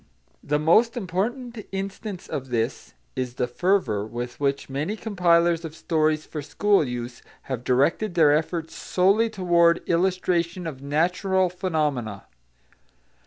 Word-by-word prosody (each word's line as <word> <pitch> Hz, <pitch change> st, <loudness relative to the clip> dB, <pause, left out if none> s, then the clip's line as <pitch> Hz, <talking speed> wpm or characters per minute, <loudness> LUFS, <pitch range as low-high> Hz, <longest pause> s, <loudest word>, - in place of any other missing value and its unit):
The 150 Hz, -, +1 dB
most 215 Hz, +11 st, +3 dB
important 230 Hz, +4 st, -3 dB
instance 195 Hz, 0 st, -5 dB
of 135 Hz, -2 st, -5 dB
this 115 Hz, -, -2 dB, 0.2 s
is 125 Hz, -1 st, -3 dB
the 125 Hz, -, 0 dB
fervour 125 Hz, -, +1 dB
with 120 Hz, +2 st, -6 dB
which 140 Hz, -1 st, -1 dB
many 150 Hz, +10 st, -2 dB
compilers 175 Hz, -6 st, +2 dB
of 160 Hz, -1 st, -7 dB
stories 155 Hz, -2 st, 0 dB
for 150 Hz, -, -6 dB
school 195 Hz, +7 st, +2 dB
use 120 Hz, -2 st, -5 dB, 0.2 s
have 130 Hz, -3 st, -4 dB
directed 155 Hz, +11 st, +1 dB
their 155 Hz, -4 st, +5 dB
efforts 160 Hz, +1 st, -1 dB
solely 200 Hz, +5 st, +2 dB
toward 170 Hz, -4 st, +2 dB
illustration 180 Hz, 0 st, 0 dB
of 140 Hz, -5 st, -6 dB
natural 180 Hz, +5 st, +1 dB
phenomena. 150 Hz, -, -2 dB
170 Hz, 125 wpm, -24 LUFS, 140-190 Hz, 0.2 s, their